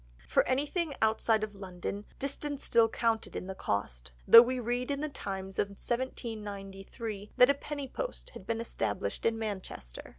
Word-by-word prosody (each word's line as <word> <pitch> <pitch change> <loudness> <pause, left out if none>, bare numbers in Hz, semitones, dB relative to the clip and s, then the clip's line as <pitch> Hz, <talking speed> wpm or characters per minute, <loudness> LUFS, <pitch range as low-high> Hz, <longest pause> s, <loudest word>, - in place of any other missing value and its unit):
For 65 - +4
anything 290 +4 0
outside 220 0 +3
of 215 -1 -3
London, 195 +1 -5
distance 285 +1 -3
still 230 -1 +4
counted 225 -1 0
in - - -3
the 190 - -4
cost, 65 - -3 0.2
though 230 - +12
we 255 +1 0
read 245 +2 -1
in 280 -1 -1
The 305 +1 -2
Times 195 -7 -5
of 205 - +3
1793 210 -2 -5
that 250 +2 +8
a - - +2
penny 285 0 -5
post - - -5
had - - -11
been 230 -1 -1
established 105 - -2
in 225 0 +1
Manchester. 190 - -6
225 Hz, 165 wpm, -31 LUFS, 195-255 Hz, 0.2 s, though